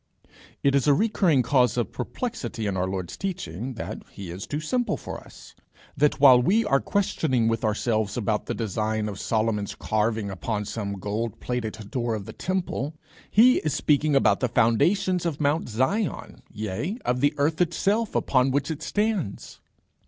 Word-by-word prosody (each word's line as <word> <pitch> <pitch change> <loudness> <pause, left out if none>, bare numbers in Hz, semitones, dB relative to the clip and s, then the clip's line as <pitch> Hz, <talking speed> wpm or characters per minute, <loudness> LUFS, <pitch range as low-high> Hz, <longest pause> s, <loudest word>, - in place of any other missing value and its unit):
It 140 - +4
is 140 +1 +2
a 145 - +6
recurring 180 - +2
cause 125 -1 +3
of 120 - -1
perplexity 235 - -4
in 100 -2 -1
our 95 0 0
Lord's 95 -2 -4
teaching, 130 - -4
that - - -6
he 95 -4 -8
is 90 +3 -7
too 150 - -2
simple 245 +11 -1
for - - -7
us; - - -15 0.4
that 145 -1 +2
while 130 -3 +8
we 210 - +3
are 135 -8 +3
questioning 145 - 0
with 115 -1 0
ourselves 110 0 0
about 105 -2 -1
the - - -2
design 110 0 -1
of 105 -1 -6
Solomon's 110 -2 -1
earring 110 -1 0
upon 105 +3 -3
some 100 -1 -4
gold 105 +3 -3
plated 110 -4 -4
door 120 -3 -1
of 105 -3 -6
the - - -8
temple, 175 -5 -2 0.3
he 245 +4 +6
is 155 -2 -1
speaking 150 -1 +2
about 135 - +4
the 125 - 0
foundations 180 - +2
of 165 -4 -2
Mount 150 -1 +1
Zion, 130 - -1
yea, 110 - -3
of 125 0 0
the 145 +1 +2
earth 155 +4 +1
itself, 200 +6 +1
upon 130 0 +2
which 140 +3 0
it 155 - -5
stands. 205 - -2
125 Hz, 170 wpm, -25 LUFS, 110-160 Hz, 0.4 s, while